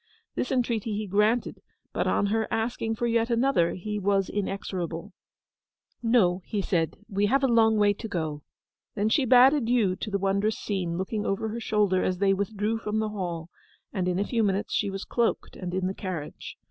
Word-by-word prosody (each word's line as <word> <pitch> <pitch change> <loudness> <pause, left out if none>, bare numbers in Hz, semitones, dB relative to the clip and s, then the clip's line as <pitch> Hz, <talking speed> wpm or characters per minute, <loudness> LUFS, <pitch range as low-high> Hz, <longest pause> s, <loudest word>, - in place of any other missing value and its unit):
This 250 - -2
entreaty 230 -4 0
he 215 - -2
granted; 210 +5 +1 0.3
but - - 0
on - - +2
her 225 -1 +1
asking 225 0 -1
for 240 - -2
yet 230 0 +1
another, 235 -7 +2
he 210 +3 -4
was 195 -1 +1
inexorable. 190 -2 -4 0.9
'No,' 215 -6 +3
he 210 - -3
said. 170 -4 0
'We 205 -1 +1
have 270 +5 +2
a - - +5
long 225 -2 +4
way 205 -1 +4
to 225 +3 -7
go.' 160 -7 -3 0.5
Then 210 +1 +1
she 260 +4 +3
bade 255 +3 +7
adieu 235 -8 +2
to 215 - -4
the 200 - 0
wondrous 200 +2 0
scene, 180 -5 -2
looking 205 +3 -2
over 195 +3 -1
her 230 +2 -4
shoulder 210 -4 +1
as 185 - 0
they 195 +1 +3
withdrew 210 +3 -1
from 215 -1 -2
the 220 0 0
hall; 175 -5 -4 0.4
and 185 -2 -1
in 180 0 0
a 200 - +1
few 235 0 0
minutes 200 -1 0
she 205 - +1
was 195 0 -5
cloaked 235 -1 -1
and 180 -2 -5
in 185 0 -1
the 190 - -1
carriage. 180 -7 -6
205 Hz, 195 wpm, -27 LUFS, 190-225 Hz, 0.9 s, bade